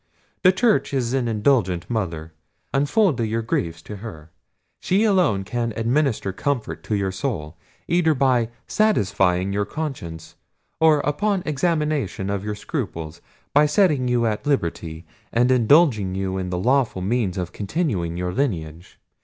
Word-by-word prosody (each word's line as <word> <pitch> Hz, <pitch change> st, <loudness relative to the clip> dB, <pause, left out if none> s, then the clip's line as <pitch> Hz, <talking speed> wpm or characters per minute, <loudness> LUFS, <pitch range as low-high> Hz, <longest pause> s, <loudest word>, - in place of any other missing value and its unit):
The 185 Hz, -, +6 dB
church 205 Hz, -, +1 dB
is 125 Hz, -2 st, 0 dB
an 130 Hz, -3 st, 0 dB
indulgent 105 Hz, -6 st, +1 dB
mother: 85 Hz, -8 st, -3 dB, 0.4 s
unfold 145 Hz, -, +2 dB
your 115 Hz, 0 st, -1 dB
griefs 85 Hz, -7 st, -2 dB
to 105 Hz, -, -8 dB
her: 80 Hz, -7 st, -10 dB, 0.5 s
she 195 Hz, +4 st, +1 dB
alone 180 Hz, -, +2 dB
can 115 Hz, +3 st, -2 dB
administer 120 Hz, -3 st, 0 dB
comfort 130 Hz, +1 st, -2 dB
to 105 Hz, -, -1 dB
your 100 Hz, -2 st, 0 dB
soul, 95 Hz, -, -4 dB, 0.3 s
either 165 Hz, -2 st, +3 dB
by 125 Hz, -4 st, +2 dB, 0.2 s
satisfying 100 Hz, -, +1 dB
your 100 Hz, 0 st, 0 dB
conscience, 95 Hz, -, -6 dB, 0.5 s
or 160 Hz, -2 st, +5 dB
upon 195 Hz, +6 st, 0 dB
examination 150 Hz, -, -1 dB
of 100 Hz, -1 st, -2 dB
your 105 Hz, 0 st, -3 dB
scruples, 80 Hz, -5 st, -5 dB, 0.3 s
by 150 Hz, +1 st, +5 dB
setting 150 Hz, -6 st, +2 dB
you 120 Hz, -1 st, +2 dB
at 110 Hz, +5 st, -2 dB
liberty, 85 Hz, -, -2 dB, 0.3 s
and 125 Hz, +2 st, +3 dB
indulging 120 Hz, -, +4 dB
you 95 Hz, -1 st, -2 dB
in 90 Hz, -1 st, -3 dB
the 90 Hz, -, -2 dB
lawful 120 Hz, -2 st, +1 dB
means 100 Hz, -3 st, 0 dB
of 90 Hz, -2 st, -3 dB
continuing 100 Hz, -, -2 dB
your 90 Hz, 0 st, -2 dB
lineage. 85 Hz, -, -3 dB
115 Hz, 145 wpm, -22 LUFS, 95-145 Hz, 0.5 s, The